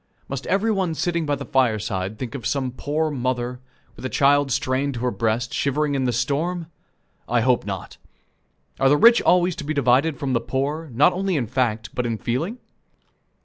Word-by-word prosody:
Must 140 0 -5
every 200 +4 +2
one 190 -6 0
sitting 170 -1 -1
by 145 - +1
the 140 0 -7
fireside 110 -6 0
think 120 -2 -5
of 125 -5 -4
some 130 -3 -1
poor 150 +4 -2
mother, 125 -2 -2 0.4
with - - -12
a 130 - -2
child 140 0 +3
strained 130 +2 0
to 120 - -5
her 125 0 0
breast, 115 +3 -1
shivering 145 +1 0
in 135 -2 0
the 125 - +1
storm? 150 +8 -1 0.6
I - - +2
hope - - +2
not. - - -6 0.8
Are 135 - +4
the 145 - +5
rich 235 +7 +7
always 180 -1 +3
to 175 - -5
be 155 +2 -3
divided 140 +3 +3
from 135 -1 -2
the 115 - +1
poor, 145 +4 -2
not 145 +9 +4
only 190 0 -1
in 135 -5 0
fact, 110 -2 -1
but 125 -1 -1
in 115 -1 -2
feeling? 150 - -2
135 Hz, 190 wpm, -23 LUFS, 120-155 Hz, 0.8 s, rich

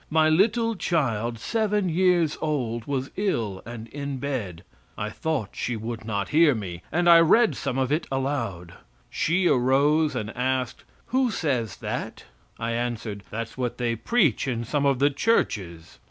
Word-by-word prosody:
My 155 0 +4
little 225 +7 +2
child, 120 - -1
seven 210 - 0
years 175 -2 +2
old, 120 -7 -2
was 135 -1 -3
ill 115 - -1
and 115 -1 -7
in 140 +1 -5
bed. 120 -11 -4 0.3
I 105 +1 -3
thought 145 -6 -2
she 120 - -3
would 110 0 -5
not 100 -3 -2
hear 155 -3 +5
me, 90 -5 -6
and 175 +2 +1
I 170 -1 +9
read 220 +8 +5
some 135 -1 -3
of 130 0 0
it 155 +3 0
aloud. 115 -11 -2 0.4
She 180 +3 +1
arose 145 +3 +3
and 105 +1 -4
asked, 130 -1 -2 0.3
"Who 260 -1 +3
says 130 - -1
that?" - - -5 0.3
I 115 0 -2
answered, 115 -3 -3
"That's 115 +3 -6
what 125 -2 -2
they 120 -2 0
preach 155 - +1
in 120 -3 -1
some 140 +4 0
of 135 -2 +2
the 140 +3 +3
churches." 95 - -1
135 Hz, 160 wpm, -25 LUFS, 115-160 Hz, 0.4 s, I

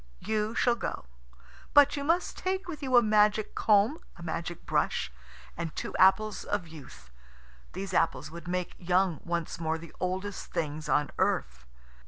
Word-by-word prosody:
You 215 +1 -1
shall 240 - +3
go. 235 - -4 0.7
But 290 -1 +7
you 285 - -3
must 335 +5 +1
take 375 0 -2
with 310 -4 -6
you 260 -3 +3
a 240 - +7
magic 210 0 +3
comb, 215 +8 +3 0.2
a 170 - -10
magic 170 +1 -4
brush, - - 0 0.4
and 165 -2 -5
two - - -4
apples 195 +2 +4
of 200 -4 -2
youth. 65 - -13 0.6
These 190 0 -5
apples 165 - +1
would 170 +1 -9
make 180 0 -2
young 180 -2 +1
once 170 -1 -3
more 160 -1 -1
the 165 0 -12
oldest 190 +2 -3
things 155 0 -3
on 150 0 +2
earth." 60 - 0
185 Hz, 160 wpm, -29 LUFS, 165-215 Hz, 0.7 s, But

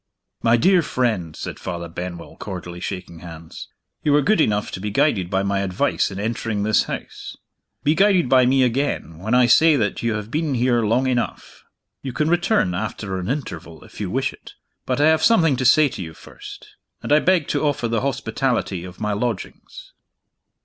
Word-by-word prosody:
"My 115 0 +4
dear 180 +7 +4
friend," 110 - -1
said - - -7
Father 85 -1 -5
Benwell, 85 0 -7
cordially 90 -3 -7
shaking 85 -2 -6
hands, 80 -2 -10 0.3
"you 150 - +2
were 145 0 +4
good 215 -1 +3
enough 105 -6 0
to - - -6
be 105 +2 -3
guided 100 - +1
by 95 0 0
my 100 0 0
advice 100 +8 0
in 95 -1 -7
entering 110 -1 -2
this 110 -1 +2
house. - - -7 0.5
Be 150 - +3
guided 190 -3 +3
by 130 0 +5
me 130 +1 +3
again, 125 - -1
when 110 +6 0
I 125 0 +5
say 155 +6 +5
that 105 -7 -1
you 115 -1 0
have 105 +1 -6
been 155 -3 -1
here 120 -1 +2
long 115 +4 +1
enough. 125 -2 -3 0.4
You 130 -2 -5
can 150 +5 0
return, 175 - +2
after 95 0 -4
an 90 - -4
interval, 85 - -5
if - - -11
you - - -2
wish - - -1
it. - - -14 0.3
But 130 0 0
I 145 - +4
have 160 0 +4
something 165 -9 +4
to 130 - -2
say 150 +5 +6
to 100 - -7
you 80 -3 -8
first - - -13 0.3
and - - +1
I 150 - +6
beg 175 -3 +2
to - - 0
offer 145 -5 0
the 115 0 -1
hospitality 120 -7 -1
of 90 0 -10
my 105 -1 -1
lodgings." 110 0 -5
115 Hz, 195 wpm, -21 LUFS, 95-145 Hz, 0.5 s, say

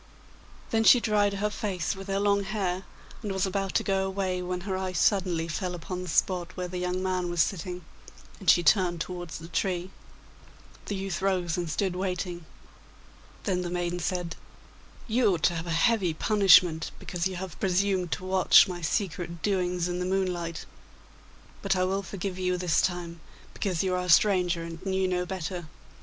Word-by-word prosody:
Then 225 0 +2
she 245 - +8
dried 205 -3 +2
her 210 +1 -1
face 195 -5 -2
with 195 0 -9
her 195 0 0
long 200 0 +2
hair, 190 -2 -2 0.4
and 210 -3 -4
was 190 -1 0
about 195 0 -2
to - - +3
go 195 -1 +1
away, 190 -1 -2
when 180 0 -3
her 190 0 -3
eye 185 -1 -3
suddenly 175 -2 +1
fell 180 +2 -3
upon 180 +2 -5
the 180 - -6
spot 180 +2 0
where 180 0 -2
the 180 0 -5
young 180 +1 -2
man 185 -1 -1
was 175 -2 +3
sitting, 180 -2 -5 0.5
and 190 - 0
she 175 - +6
turned 175 0 +3
towards 175 0 -5
the 165 - -9
tree. 180 +1 -2 1.0
The 205 - -2
youth 190 -2 -3
rose 180 -4 0
and 175 -2 -3
stood 180 +4 -1
waiting. 180 -2 -3 1.0
Then 185 -3 0
the 175 - -3
maiden 175 0 -2
said, 175 -1 -2 0.7
'You 220 -4 +3
ought 160 - -7
to - - +4
have 165 +1 -4
a - - -4
heavy 180 0 +2
punishment 180 -4 +5
because 175 0 -2
you 190 - -6
have 180 -2 -7
presumed 190 -1 +1
to 185 - -5
watch 190 +1 +6
my 180 -2 -5
secret 170 0 -2
doings 180 -3 0
in 175 0 -3
the 180 - -1
moonlight. 180 -3 -2 1.0
But 195 -1 +1
I 185 - +1
will 190 +2 0
forgive 190 0 -5
you 180 -1 0
this 175 -2 +2
time, 175 -2 -3 0.3
because 185 -5 -1
you 185 -1 0
are 180 0 -1
a - - -5
stranger 180 -1 +4
and 165 0 -8
knew 190 -1 0
no 180 -1 -1
better. 180 -2 -4
180 Hz, 185 wpm, -28 LUFS, 175-195 Hz, 1.0 s, she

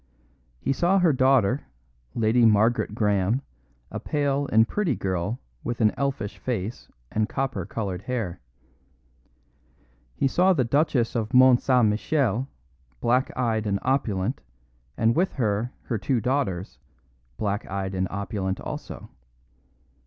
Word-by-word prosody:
He 135 - 0
saw 175 +8 +2
her 175 -5 +4
daughter, 130 -1 +3 0.5
Lady 115 +2 +3
Margaret 110 0 +3
Graham, 105 +3 +1 0.5
a - - -4
pale 145 -1 -1
and 110 +1 +5
pretty 185 - 0
girl 95 +5 -2 0.2
with 120 - -3
an 110 -2 +4
elfish 135 -7 -3
face 115 -2 -4 0.2
and 110 +1 0
copper 125 -9 -2
coloured 100 -5 -4
hair. 110 -6 -4 1.7
He 135 - +1
saw 185 +7 +3
the 135 - +2
Duchess 130 -2 +1
of 115 0 -1
Mont 130 -1 +7
St. 125 -3 +3
Michel, 120 +2 0 0.5
black 125 +2 +2
eyed 110 -3 0
and 100 -1 +1
opulent, 120 -5 0 0.6
and 115 +1 +3
with 185 +3 +1
her 110 -1 -1
her 115 - -2
two 120 +5 0
daughters, 120 -8 -2 0.6
black 105 0 -2
eyed 95 0 -3
and 95 0 0
opulent 95 -1 -3
also. - - -7
115 Hz, 130 wpm, -25 LUFS, 105-130 Hz, 1.7 s, Mont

